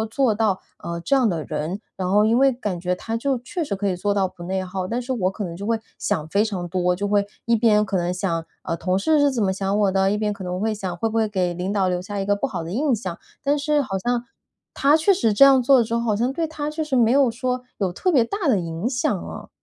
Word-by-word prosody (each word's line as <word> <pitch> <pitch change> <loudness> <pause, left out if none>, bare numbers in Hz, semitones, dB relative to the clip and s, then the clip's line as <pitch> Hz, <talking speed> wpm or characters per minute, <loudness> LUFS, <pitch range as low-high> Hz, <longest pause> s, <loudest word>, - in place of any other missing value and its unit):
做 260 -5 +3
到， 210 -3 +1 0.2
呃， 170 0 -5
这 275 - +1
样 255 -4 +3
的 165 -4 -2
人。 155 +6 -3 0.2
然 185 -1 -2
后 210 +2 +5
因 225 +2 +3
为 270 +1 +5
感 210 -8 -4
觉 180 +1 -1
他 225 +5 -4
就 270 +2 0
确 295 +8 -4
实 285 - -3
可 200 +1 -2
以 185 - 0
做 205 +3 0
到 195 -2 +1
不 175 -1 -12
内 190 +2 -2
耗， 185 0 -4
但 235 +5 -2
是 255 +2 -3
我 190 -6 0
可 205 - -5
能 170 -3 -5
就 200 +4 -6
会 230 -1 +1 0.2
想 160 -7 -1
非 200 +5 +2
常 185 -5 -3
多， 180 0 +1
就 200 +3 -2
会 200 0 +2 0.2
一 235 - +3
边 215 -2 +3
可 195 -1 -1
能 175 0 0
想， 170 -3 -2 0.2
呃， 165 - -2
同 185 +3 0
事 305 +10 +2
是 285 -1 +4
怎 240 -5 0
么 190 - +2
想 195 +1 -1
我 200 -2 +3
的？ 195 0 +2
一 210 - 0
边 210 -1 -1
可 200 -2 -9
能 180 0 -3
会 220 +2 0
想， 190 -4 -4
会 225 - 0
不 220 - -6
会 225 -1 +2
给 185 -4 -1
领 180 +3 -3
导 200 -2 +1
留 180 -1 -1
下 200 +2 -5
一 195 - -2
个 205 +1 +2
不 205 - -1
好 265 - -4
的 165 - -6
印 265 +5 +1
象。 185 -6 -5 0.3
但 285 +1 +2
是 295 0 +2
好 195 -8 -3
像 240 +3 -1 0.5
他 285 +2 +4
确 355 +6 +4
实 230 - +1
这 205 - +6
样 270 -2 +6
做 265 +2 +5
了 - - +4
之 225 +1 -5
后， 235 - +2
好 225 -3 +1
像 240 +5 0
对 325 +2 -1
他 300 -1 -4
确 310 +1 -3
实 300 -3 -2
没 235 -2 +4
有 270 -1 +4
说 250 +2 -2
有 190 -3 0
特 365 - 0
别 265 -8 +5
大 380 - -3
的 245 -7 +4
影 170 +5 -3
响 245 -2 0
啊。 - - -8
210 Hz, 310 characters per minute, -23 LUFS, 185-250 Hz, 0.5 s, 这